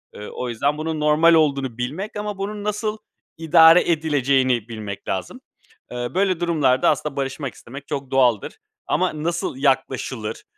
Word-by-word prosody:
Iıı, 105 - -8
o 125 - -5
yüzden 140 +6 -1
bunun 160 0 -3
normal 155 +3 +4
olduğunu 140 -6 +1
bilmek 155 +14 -4
ama 210 -1 -4
bunun 205 +1 -5
nasıl 210 +1 -2 0.4
idare 165 +1 +6
edileceğini 135 -7 +1
bilmek 105 -3 -7
lazım. 95 -2 -4 0.5
Iıı, 120 +2 -4
böyle 190 -3 +1
durumlarda 150 -7 +2
aslında 150 -2 -1
barışmak 135 0 -4
istemek 135 +4 -11
çok 140 -3 -5
doğaldır 125 -5 +1 0.3
ama 155 0 -1
nasıl 170 -5 -2
yaklaşılır, 130 -5 -1
145 Hz, 140 wpm, -22 LUFS, 130-165 Hz, 0.5 s, idare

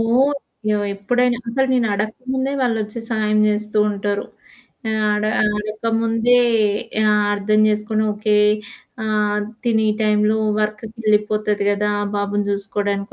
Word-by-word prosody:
ఓహ్! 250 +6 +2 0.4
ఎవ 210 -1 0
ఎప్పుడైనా 245 +5 +1
అసలు 265 +3 +1
నేను 245 -3 +2
అడక్కముందే 255 +6 -2
వాళ్ళొచ్చి 225 -3 -1
సాయం 215 -2 +1
జేస్తూ 210 0 -1
ఉంటారు. 205 0 -2 0.7
ఆ! - - 0 0.2
అడ 210 0 -1 0.3
అడక్కముందే 225 +2 +1 0.7
ఆహ్, 210 -1 +3
అర్థం 210 +1 +1
జేసుకొని, 215 +1 0
ఓకే, 210 0 +1 0.7
ఆహ్, 210 -1 0 0.2
తినీ 220 -2 +2 0.2
టైంలో 210 0 +2 0.2
వర్క్‌కి 215 +1 -3
ఎళ్ళిపోతది 210 -1 +1
గదా! 210 +1 0 0.2
బాబుని 205 0 -1
జూసుకోడానికి 200 0 -2
215 Hz, 115 wpm, -20 LUFS, 210-225 Hz, 0.7 s, ఆహ్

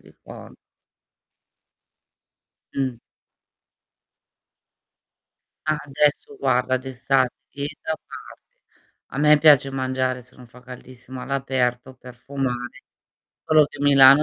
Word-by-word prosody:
ricor - - -14 2.2
Mh. 130 -3 -1 2.7
Ah 155 -1 +1
adesso, 150 - 0
guarda, 125 - +1
d'estate, 130 0 0 0.2
tieni 140 +1 -5
da 160 - -2
parte, - - -14 0.5
a - - -8
me 150 +1 +6
piace 145 -3 +5
mangiare, 130 -1 -2
se 125 +2 -21
non 125 - -14
fa 125 +2 -17
caldissimo, 125 0 -11
all'aperto 130 -2 -2
per 125 0 -13
fumare, 125 0 -4 0.6
solo 155 -1 +5
che 145 - -10
Milano 140 0 +7
130 Hz, 95 wpm, -23 LUFS, 125-145 Hz, 2.7 s, Milano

